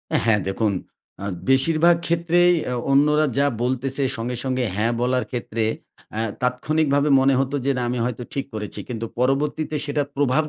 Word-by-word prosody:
এ -, -, +5 dB
হ্যাঁ। 110 Hz, -3 st, +4 dB
দেখুন 105 Hz, +2 st, 0 dB, 0.5 s
আ -, -, -3 dB, 0.2 s
বেশিরভাগ 155 Hz, +6 st, +4 dB
ক্ষেত্রেই 170 Hz, +1 st, +3 dB
অ্যা 125 Hz, -, -2 dB, 0.2 s
অন্যরা 150 Hz, +2 st, +4 dB
যা 140 Hz, +1 st, +4 dB, 0.2 s
বলতেছে, 130 Hz, +2 st, -1 dB
সঙ্গে, 120 Hz, +2 st, -3 dB
সঙ্গে 130 Hz, -1 st, -1 dB
হ্যাঁ 115 Hz, +3 st, +1 dB
বলার 125 Hz, +1 st, +1 dB
ক্ষেত্রে 115 Hz, -2 st, -2 dB, 0.5 s
অ্যা 110 Hz, -, -2 dB, 0.2 s
তাৎক্ষণিকভাবে 145 Hz, +3 st, +1 dB
মনে 135 Hz, +1 st, +4 dB
হতো 135 Hz, +1 st, 0 dB
যে, 140 Hz, -, +3 dB
"না, 125 Hz, -, -1 dB
আমি 125 Hz, 0 st, -2 dB
হয়তো 125 Hz, 0 st, -3 dB
ঠিক 140 Hz, -, -2 dB
করেছি।" 105 Hz, -2 st, -5 dB
কিন্তু 115 Hz, -2 st, -3 dB
পরবর্তীতে 145 Hz, +4 st, 0 dB
সেটার 145 Hz, -1 st, -1 dB
প্রভাব 140 Hz, +1 st, +2 dB
135 Hz, 165 wpm, -22 LUFS, 125-150 Hz, 0.5 s, এ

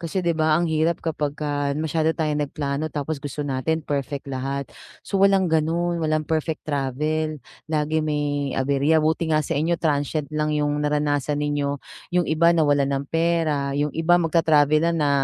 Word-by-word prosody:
Kasi, 175 Hz, +2 st, -3 dB
'di 170 Hz, -, +2 dB
ba, 155 Hz, -1 st, +2 dB
ang 175 Hz, -, +1 dB
hirap 160 Hz, +1 st, 0 dB
kapagka 145 Hz, -2 st, -2 dB
masyado 160 Hz, +1 st, 0 dB
tayong 150 Hz, -2 st, 0 dB
nagplano. 145 Hz, +1 st, -3 dB
Tapos 150 Hz, 0 st, -4 dB
gusto 145 Hz, 0 st, -5 dB
natin 145 Hz, +3 st, -1 dB
perfect 140 Hz, -1 st, -3 dB
lahat. 135 Hz, 0 st, -4 dB, 0.3 s
So, 195 Hz, -, -1 dB
walang 195 Hz, -3 st, +4 dB
gano'n, 170 Hz, +2 st, +1 dB
walang 155 Hz, -1 st, 0 dB
perfect 160 Hz, 0 st, -2 dB
travel 150 Hz, +2 st, -1 dB, 0.3 s
lagi 155 Hz, 0 st, 0 dB
may 145 Hz, -2 st, -1 dB
aberya. 140 Hz, +3 st, +2 dB
Buti 160 Hz, +1 st, +1 dB
nga 155 Hz, -1 st, +2 dB
sainyo 160 Hz, +5 st, 0 dB
transient 150 Hz, -1 st, -1 dB
lang 150 Hz, 0 st, 0 dB
yung 145 Hz, 0 st, 0 dB
naranasan 150 Hz, -1 st, 0 dB
ninyo, 145 Hz, -1 st, -1 dB, 0.3 s
yung 180 Hz, -1 st, +1 dB
iba 170 Hz, +2 st, +3 dB
nawalan 145 Hz, -3 st, +3 dB
ng 140 Hz, 0 st, -1 dB
pera, 160 Hz, -4 st, +1 dB
yung 145 Hz, 0 st, 0 dB
iba 165 Hz, +2 st, +3 dB
magta-travel 155 Hz, -3 st, +3 dB
na 170 Hz, +1 st, +2 dB
na 150 Hz, -3 st, +1 dB
155 Hz, 160 wpm, -23 LUFS, 145-160 Hz, 0.3 s, walang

